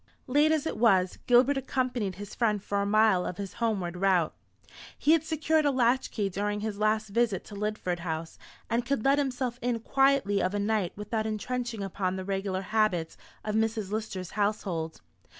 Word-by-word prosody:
Late 295 +4 +3
as 315 -2 +1
it - - -3
was, 190 -6 +3
Gilbert 255 +3 +5
accompanied 250 -7 -1
his 205 +1 -8
friend 215 -3 +1
for 200 +1 -2
a 200 - -1
mile 215 -3 +4
of 180 - -4
his 195 -2 -5
homeward 195 -7 0
route. 185 -3 +2 0.6
He 300 - +2
had 325 -1 +4
secured 315 0 +1
a 290 - +3
latch 255 -1 +2
key 205 -3 -1
during 205 +2 -2
his 210 -1 -4
last 215 0 +1
visit 220 -2 +1
to 205 - -11
Lidford 205 -4 -2
House, 165 -1 -5 0.3
and 235 +1 0
could 255 -1 -1
let 275 +1 +4
himself 255 -3 -2
in 240 -1 0
quietly 270 -5 +2
of 185 +2 0
a - - 0
night 205 -3 0
without 215 +2 -2
entrenching 235 0 -3
upon 190 -1 -2
the 190 0 -5
regular 195 -1 -2
habits 210 -6 0 0.3
of 215 - -2
Mrs. 220 -2 0
Lister's 210 -4 -4
household. 195 -6 -2
215 Hz, 185 wpm, -28 LUFS, 195-245 Hz, 0.6 s, Gilbert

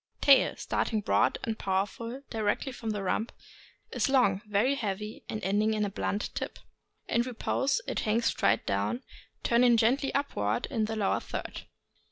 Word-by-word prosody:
Tail. 275 -2 +5
— - - -24
Starting 220 -2 -1
broad - - +2
and 225 -1 -3
powerful 205 +7 -2
directly 220 +4 -1
from 235 -3 -6
the 205 -2 -2
rump, 215 +4 -1 0.6
is - - 0
long, 225 -8 +3
very 210 +6 +2
heavy, 210 -4 -4
ending 215 +1 0
in 210 -1 +1
a 200 - -3
blunt 205 +1 -2
tip. - - -4 0.5
In 235 - +2
repose 255 - 0
it - - -2
hangs 230 +1 +1
straight 115 - +2
down, 100 +4 -1 0.4
turning 240 0 +4
gently 260 +5 +2
upward 115 - 0
in 220 -2 +1
the 220 +1 -3
lower 205 -3 +1
third. - - -6
220 Hz, 160 wpm, -29 LUFS, 200-245 Hz, 0.6 s, Tail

